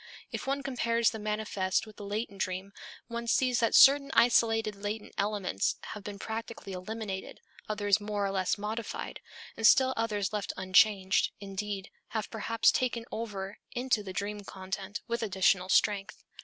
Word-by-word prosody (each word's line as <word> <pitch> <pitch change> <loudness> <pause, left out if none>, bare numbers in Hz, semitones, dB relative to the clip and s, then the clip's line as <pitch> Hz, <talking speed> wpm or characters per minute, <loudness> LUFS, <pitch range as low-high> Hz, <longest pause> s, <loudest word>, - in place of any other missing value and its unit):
If - - -5
one 275 +1 -1
compares 235 -4 +1
the 220 - -6
manifest 210 -3 -1
with 215 -1 -14
the 205 - -8
latent 205 -1 -4
dream 185 +2 -3 0.3
one 235 0 -5
sees 250 +1 +3
that 230 - +2
certain 275 0 +8
isolated 225 -2 +4
latent 205 +2 -5
elements 200 - 0 0.2
have 210 - -9
been 205 0 -6
practically 225 -1 -6
eliminated, 195 +1 -5 0.3
others 205 -1 +2
more 205 -1 -1
or 195 - -1
less 190 0 0
modified, 215 +2 -4 0.4
and 225 - +4
still 260 +2 +6
others 215 -3 -1
left 205 -1 -2
unchanged, 190 +1 +3
indeed, 200 0 -5 0.3
have 215 - -3
perhaps 225 0 +3
been - - +1
taken 240 -2 -1
over 205 -3 -5
into 245 -3 +1
the 195 -2 -7
dream 205 +2 -3
content 190 +1 -6
with 235 0 -2
additional 190 -3 +2
strength. 200 +1 +1
210 Hz, 155 wpm, -30 LUFS, 195-230 Hz, 0.4 s, certain